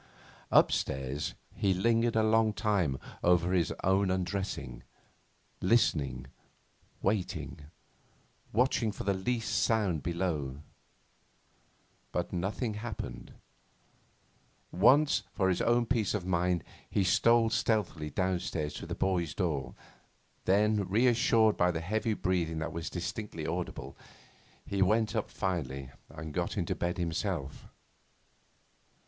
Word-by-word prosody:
Upstairs 65 +2 +1 0.2
he 95 -2 +1
lingered 115 +4 +2
a 110 - +4
long 110 0 +3
time 100 - +1 0.3
over 90 0 +3
his 85 -3 +2
own 95 +1 +3
undressing, 90 -9 -3 0.8
listening, 70 - +2 0.8
waiting, 95 -6 -2 0.8
watching 120 -2 +2
for - - -7
the 100 - +1
least 115 +5 -1
sound 100 -9 +1
below. 75 -6 -2 1.5
But 90 +1 -2
nothing 100 +6 -2
happened. 105 0 -6 1.4
Once, 135 - +5
for 95 -1 +1
his 90 - +1
own 120 0 +3
peace 110 -5 0
of 95 -4 -3
mind, 90 -2 +1 0.3
he 100 - +1
stole 115 +5 +4
stealthily 100 -10 0
downstairs 90 -4 -1
to - - -7
the - - -4
boy's 90 -4 0
door; 75 -8 -2 0.7
then, 105 0 +2
reassured 115 0 +4
by 90 - +3
the 85 -2 -1
heavy 110 +5 -1
breathing 85 -5 0
that 80 0 -3
was 85 -1 -4
distinctly 90 -2 -5
audible, 85 +2 -4 0.7
he 100 -1 -2
went 110 +3 +2
up 110 - -1
finally 70 -8 -3 0.2
and 80 -1 -8
got - - -2
into - - 0
bed 85 +1 -2
himself. 85 -3 -3
95 Hz, 115 wpm, -31 LUFS, 85-110 Hz, 1.5 s, Once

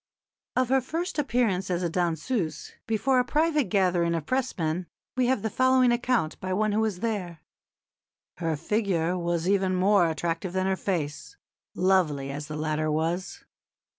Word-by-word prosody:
Of 255 -1 +2
her 265 0 +3
first 325 +6 -3
appearance 230 -10 +1
as 180 0 -1
a - - +2
danseuse, 170 - -2
before 250 +4 +2
a - - +3
private 300 +2 +1
gathering 180 -5 +2
of 160 -3 -3
Pressmen, 180 -10 -1 0.3
we 255 -1 +2
have 255 -5 +1
the 220 - 0
following 255 0 +4
account 240 -8 0
by 185 0 -3
one 215 +2 +1
who 210 - +1
was 215 -5 -1
there: 190 -8 -3 1.0
"Her 165 -2 -1
figure 180 0 0
was 170 -1 -1
even 190 -1 +2
more 185 -1 +4
attractive 165 +2 -2
than 190 0 0
her 190 0 +1
face, 175 - -3 0.4
lovely 165 -7 +2
as 145 +2 -6
the 155 -1 -5
latter 155 0 -1
was. 165 +4 -2
185 Hz, 160 wpm, -27 LUFS, 165-235 Hz, 1.0 s, following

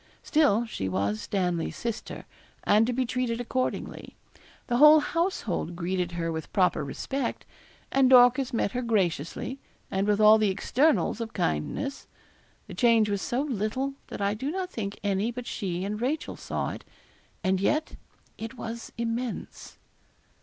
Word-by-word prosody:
Still 275 -8 +3
she 95 - -4
was 100 +3 -1
Stanley's 180 -4 -1
sister, 235 -2 -5 0.4
and 215 +2 +4
to - - +1
be 255 +1 0
treated 245 -1 -1
accordingly. 255 +1 -3 0.5
The 240 - 0
whole 300 +3 +9
household 295 - -1
greeted 180 0 -2
her 165 -1 -2
with 160 -1 -5
proper 180 -5 +2
respect, 255 - -3 0.5
and 265 -1 +4
Dorcas 255 +1 +6
met 225 -4 0
her 250 - -2
graciously, 205 - -1 0.3
and 195 +1 0
with 210 0 +2
all 215 +1 +7
the 215 -2 +3
externals 250 +6 +1
of 225 -1 -5
kindness. 80 - -2 0.6
The - - -10
change 230 -4 +4
was 200 -1 -1
so 245 +2 -1
little, 260 +1 -2
that - - -7
I 200 0 +1
do 260 +7 -3
not 365 +2 -3
think 205 - -5
any 200 +2 +1
but 245 0 -6
she 185 -5 -3
and 210 +2 -4
Rachel 290 +6 -2
saw - - -3
it; - - -8 0.6
and 190 0 +1
yet 305 +9 0 0.4
it 225 +3 -6
was 230 +1 -6
immense. 235 +1 -4
225 Hz, 155 wpm, -27 LUFS, 190-255 Hz, 0.6 s, whole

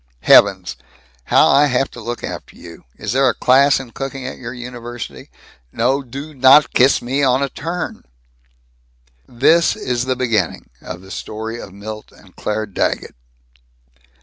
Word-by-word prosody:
Heavens, - - +4 0.5
how - - +5
I 145 +1 +5
have 130 0 0
to 120 - -10
look 120 +2 -5
after - - -7
you! 85 -6 -13
Is 105 - -4
there 130 +1 +3
a 120 - -2
class 135 +2 +4
in 130 -3 -10
cooking 135 0 -6
at 130 - -7
your 115 -2 -7
university? 120 -1 -8 0.4
No 130 +5 +1
do 140 +4 -9
not 135 +2 +5
kiss 130 +1 +4
me 130 +4 -1
on 130 0 +2
a 140 - -1
turn!" 170 +6 -5 1.2
This 160 +8 +3
is 125 0 -2
the 130 0 0
beginning 115 -8 -1
of 90 -1 -8
the 95 0 -14
story 110 +3 -6
of - - -10
Milt 105 +2 -9
and 95 -3 -20
Claire 110 +1 -3
Daggett. 100 - -2
125 Hz, 155 wpm, -18 LUFS, 110-135 Hz, 1.2 s, how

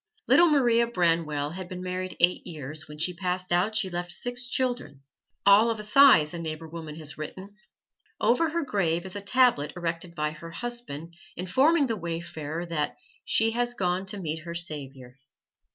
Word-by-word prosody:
Little 345 0 +6
Maria 240 -5 +3
Branwell 165 -8 0
had 180 +1 -7
been 180 0 -6
married 185 0 -4
eight 175 +1 +2
years; 155 -1 -6
when 150 0 -10
she 170 +4 0
passed 180 +1 -3
out 190 +5 +2
she 215 -3 +2
left 175 -1 -4
six 245 +6 -3
children, 245 - -2 0.4
"all 200 +3 +7
of 225 -1 -2
a - - -5
size," 210 - +6
a 170 - -4
neighbor 160 0 -5
woman 160 -2 -8
has 150 -3 -5
written. 185 +6 -7 0.7
Over 320 +7 +3
her 335 +1 -1
grave 175 -8 0
is 190 - -6
a 205 - -3
tablet 200 - +3
erected 170 0 -4
by 150 -1 -1
her 155 +2 -10
husband 170 -6 -6 0.2
informing 270 - +3
the 230 -3 -1
wayfarer 165 -2 -5
that 150 -4 -1 0.3
"she 225 0 +3
has 240 +1 -1
gone 185 -1 -1
to 205 - -4
meet 160 -4 -3
her 170 +1 -7
Savior." 135 -6 -4
180 Hz, 175 wpm, -27 LUFS, 160-225 Hz, 0.7 s, all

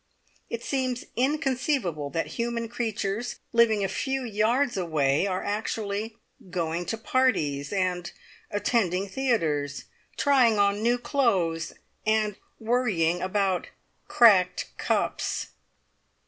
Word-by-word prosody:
It 235 0 -4
seems 255 -3 -1
inconceivable 260 - 0
that 165 +4 -1 0.2
human 235 0 -2
creatures, 225 -1 -2 0.2
living 225 -3 +4
a - - +1
few 265 +7 -2
yards 235 +5 +1
away, 155 -3 +1
are 185 -1 -2
actually 215 +1 -3 0.3
going 170 -1 -2
to 225 - -2
parties, 185 - +1
and 180 -3 -1 0.4
attending 200 -3 0
theatres, 165 - -1 0.3
trying 255 -6 +4
on 200 0 +2
new 240 +2 +3
clothes, 190 - 0 0.3
and 215 -1 +1 0.2
worrying 215 -8 +1
about 190 -1 0 0.4
cracked 185 -6 +4
cups. - - -1
210 Hz, 105 wpm, -27 LUFS, 180-240 Hz, 0.4 s, living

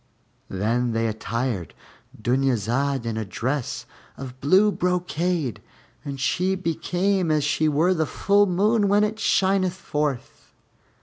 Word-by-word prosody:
Then 115 +5 0
they 115 0 0
attired 110 - -3 0.4
Dunyazad 130 +2 0
in 115 -1 -3
a 110 - -1
dress 125 +6 -3 0.3
of 130 -1 -9
blue 190 +9 +4
brocade, 175 - -1 0.4
and 140 -2 -6
she 185 +7 +1
became 180 +1 0
as 155 -1 +2
she 155 +1 +1
were 160 +5 +2
the 160 -3 0
full 205 0 +2
moon 205 +4 +2
when 205 +1 +4
it 210 +1 -1
shineth 190 -3 +2
forth. 150 -7 -4
150 Hz, 125 wpm, -24 LUFS, 125-185 Hz, 0.4 s, blue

